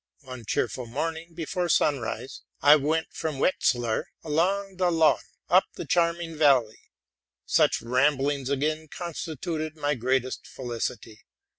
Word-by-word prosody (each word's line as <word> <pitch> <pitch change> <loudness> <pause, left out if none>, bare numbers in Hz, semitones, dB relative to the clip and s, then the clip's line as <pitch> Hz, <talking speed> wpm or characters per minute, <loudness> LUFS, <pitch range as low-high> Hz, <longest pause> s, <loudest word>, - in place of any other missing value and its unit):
One 130 -4 -9
bright 115 - 0
morning 160 +6 -4
before 175 +2 -2
sunrise, 130 -4 0 0.2
I 145 +1 +8
went 155 +3 0
from 155 -3 -3
Wetzlar 120 -7 +1 0.2
along 190 +5 0
the 180 -1 +2
Lahn, 160 -2 +4 0.3
up 185 +2 +5
the - - -6
charming 170 -1 0
valley: 135 -8 +2 0.6
such - - +2
ramblings 135 +2 +1
again 155 +3 -1
constituted 160 -1 -5
my 145 -1 0
greatest 130 0 -1
felicity. 120 -3 -5
150 Hz, 120 wpm, -26 LUFS, 130-165 Hz, 0.6 s, I